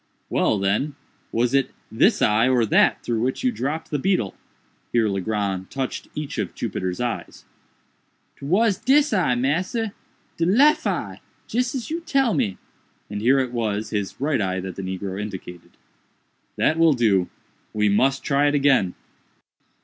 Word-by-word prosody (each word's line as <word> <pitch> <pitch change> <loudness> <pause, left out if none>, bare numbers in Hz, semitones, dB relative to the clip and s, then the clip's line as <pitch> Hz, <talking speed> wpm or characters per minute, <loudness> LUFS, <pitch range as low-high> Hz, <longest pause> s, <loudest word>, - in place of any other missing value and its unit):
"Well, 110 - +2
then, 100 +9 0 0.4
was 120 +2 +1
it 135 -1 +2 0.2
this 200 - +3
eye 110 +4 +3
or 125 -3 +3
that 105 - +3
through 115 -2 -1
which 130 - -1
you 255 - +3
dropped 160 - -4
the 145 - 0
beetle?"—here 120 - -2
Legrand 100 -1 -2
touched 135 -2 -4
each 150 -1 -4
of - - -3
Jupiter's 90 -1 -3
eyes. 120 -1 -4 0.9
"'Twas 195 +7 +1
dis 275 +4 +3
eye, 175 -11 +2
massa—de 180 - -3
lef 255 - +4
eye—jis 250 +2 -3
as 255 +2 -5
you 330 - -1
tell 275 -8 +1
me," 95 -3 0 0.5
and 105 0 -4
here 130 +5 +4
it 130 -2 0
was 110 -3 -2
his 105 -2 -3
right 140 -3 0
eye 95 -1 -1
that 95 -1 -6
the - - -5
negro 95 +1 -4
indicated. 95 -4 -8 0.8
"That 160 - +1
will 165 -2 +6
do—we 105 -1 -1
must 135 +6 +2
try 145 0 +2
it 145 - +1
again." 135 -10 +3
130 Hz, 145 wpm, -23 LUFS, 105-165 Hz, 0.9 s, will